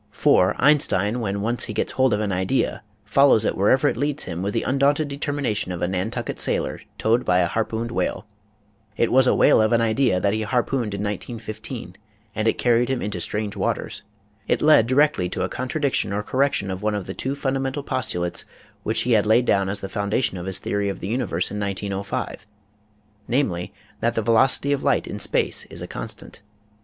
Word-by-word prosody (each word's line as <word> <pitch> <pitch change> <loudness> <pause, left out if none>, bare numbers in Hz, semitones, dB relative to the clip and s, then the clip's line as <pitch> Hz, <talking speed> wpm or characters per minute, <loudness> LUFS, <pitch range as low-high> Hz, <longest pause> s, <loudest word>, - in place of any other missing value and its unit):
For - - +3
Einstein 125 -6 +3
when 100 -4 -2
he - - -3
once 115 +3 0
gets 110 - -1
hold 130 -1 +2
of 105 0 +1
an 105 -2 -1
idea 95 +8 0 0.2
follows 115 -1 +4
it - - 0
wherever 105 +7 +3
it - - +1
leads 145 +4 0
him 85 -1 -5
with 100 +2 -1
the 115 - 0
undaunted 140 +3 +2
determination 140 -9 -2
of 90 -1 -4
a - - +2
Nantucket 90 0 -3
sailor - - -1 0.2
towed 115 +3 +2
by 90 - +2
a 90 - +3
harpooned 115 +4 -2
whale. 115 - -2 0.7
It 115 - +1
was 130 0 +5
a - - +4
whale - - +5
of 110 +2 +2
an 115 - +4
idea 115 -3 +2
that 100 +2 +1
he 110 - -1
harpooned 120 -1 -1
in 100 - -4
191 110 +3 -5
5 95 - -25 0.3
and 110 +1 -1
it - - +2
carried 120 0 +2
him 130 -2 0
into 105 -2 -3
strange 105 -1 -2
waters. - - -2 0.5
It - - +2
led 150 -7 +6
directly 130 -8 +2
to - - -3
a - - -2
contradiction 135 - -1
or 105 +1 -2
correction 130 -6 0
of 95 0 -5
one 105 0 0
of 100 -3 -4
the 95 - -5
two 135 +6 -3
fundamental 135 0 -2
postulates 90 -11 -2 0.4
which - - 0
he 125 - -1
had 110 -2 +3
laid 115 +3 +4
down 100 -4 +2
as 100 +1 -4
the 95 - -4
foundation 100 +3 -1
of 90 0 -6
his 95 -1 +1
theory 100 0 -2
of 100 - -5
the 95 - -5
universe 110 -7 -1
in 105 - -4
1905, 100 +1 -4 0.8
namely, 100 -9 -1 0.3
that 115 +1 0
the 115 - 0
veloc 115 +4 +4
ity 140 - -2
of 140 - -1
light - - +2
in - - -6
space - - 0
is - - -9
a - - -6
constant. - - -8
110 Hz, 205 wpm, -23 LUFS, 100-130 Hz, 0.8 s, led